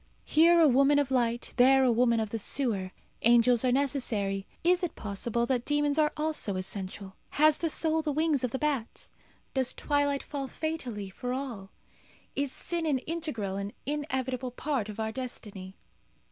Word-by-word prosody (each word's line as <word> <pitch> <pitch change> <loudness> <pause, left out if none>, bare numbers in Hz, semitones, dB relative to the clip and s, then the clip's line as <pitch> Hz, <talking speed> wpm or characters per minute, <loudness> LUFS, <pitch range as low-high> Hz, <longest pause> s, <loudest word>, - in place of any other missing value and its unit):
Here 335 +2 +5
a 325 - +7
woman 275 +2 +4
of 285 -2 +1
light, 240 -2 0
there 265 +2 +6
a 255 - +4
woman 235 0 +3
of 215 -2 -2
the 225 - -2
sewer. 205 -5 0 0.3
Angels 240 +1 +5
are 255 - +3
necessary. 230 -8 0 0.2
Is 355 +2 +3
it 355 - -3
possible 225 +3 -2
that 250 -1 0
demons 295 +1 +1
are 300 -1 +3
also 305 -10 -2
essential? 190 +1 -5
Has 305 0 +4
the 330 - 0
soul 320 +1 +1
the 305 -1 -2
wings 305 -2 +1
of 250 - +1
the 265 - -3
bat? 275 -6 -3 0.4
Does 260 -2 0
twilight 285 -1 0
fall 280 -2 -5
fatally 250 -11 -4
for 245 +6 -4
all? 245 -8 -5 0.7
Is 280 -1 -1
sin 340 +2 -3
an 285 -3 +2
integral 260 - -3
and 200 +1 -4
inevitable 260 -3 -2
part 250 -3 -2
of 210 +1 -8
our 220 0 -1
destiny? 210 -6 -7
260 Hz, 170 wpm, -29 LUFS, 225-295 Hz, 0.7 s, a